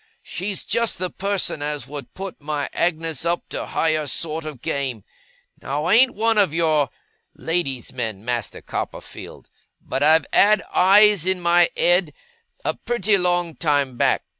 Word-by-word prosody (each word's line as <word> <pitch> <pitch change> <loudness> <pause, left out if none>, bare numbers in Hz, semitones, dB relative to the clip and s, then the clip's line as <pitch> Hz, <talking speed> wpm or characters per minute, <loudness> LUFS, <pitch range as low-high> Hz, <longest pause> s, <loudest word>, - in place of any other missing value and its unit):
She's 190 +3 -3
just 235 -1 0
the 185 -1 -2
person 195 -6 -2
as 145 -3 -3
would 140 -2 -9
put 195 -3 -7
my 145 -1 -3
Agnes 165 -3 -1
up 170 +1 -1
to - - -4
higher 155 -2 0
sort 155 +3 -3
of 150 -5 -8
game. 130 -7 -3 0.6
Now, 145 +3 -3
I 180 - +2
ain't 250 +3 +5
one 225 0 +2
of 185 -6 +2
your 155 -5 +2 0.5
lady's 150 -7 -3
men, 110 -5 -4
Master 120 -4 -3
Copperfield; - - -7 0.3
but 130 - -4
I've 155 +1 +5
had 210 0 +5
eyes 200 -1 +5
in 190 -1 +2
my 175 0 +4
ed, 175 -3 +3 0.5
a - - +1
pretty 215 -4 +1
long 175 -2 +1
time 145 -5 0
back. - - +1
165 Hz, 155 wpm, -22 LUFS, 145-185 Hz, 0.6 s, ain't